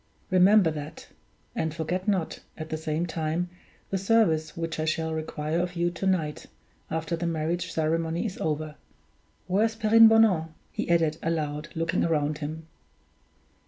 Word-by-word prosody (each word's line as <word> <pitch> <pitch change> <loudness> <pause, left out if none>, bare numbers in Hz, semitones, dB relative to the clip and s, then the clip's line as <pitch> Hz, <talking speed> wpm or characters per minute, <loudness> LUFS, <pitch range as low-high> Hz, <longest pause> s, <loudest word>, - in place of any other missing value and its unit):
Remember 185 -1 +6
that; 150 -1 -8 0.5
and 160 -1 -2
forget 175 +4 -2
not, 190 -6 0 0.2
at 155 0 -6
the 155 - -1
same 160 +1 -2
time, 165 +1 -2 0.4
the 195 - 0
service 185 -7 +2
which 165 -1 -3
I 155 - 0
shall 160 0 -1
require 155 0 -2
of 180 0 -2
you 175 0 +1
to 175 +3 -3
night, 160 -6 -1 0.4
after 160 +1 -2
the 170 +1 -2
marriage 165 +1 -1
ceremony 165 +3 0
is 195 -4 -4
over. 155 -1 -2 0.7
Where 195 +4 +2
is 225 0 -2
Perrine 225 0 +7
Bonan?" 190 -8 +3 0.2
he - - -4
added, 165 -2 +2
aloud, 155 -2 -2
looking 165 +2 0
round 150 -2 0
him. 155 +2 -5
165 Hz, 155 wpm, -27 LUFS, 155-180 Hz, 0.7 s, Perrine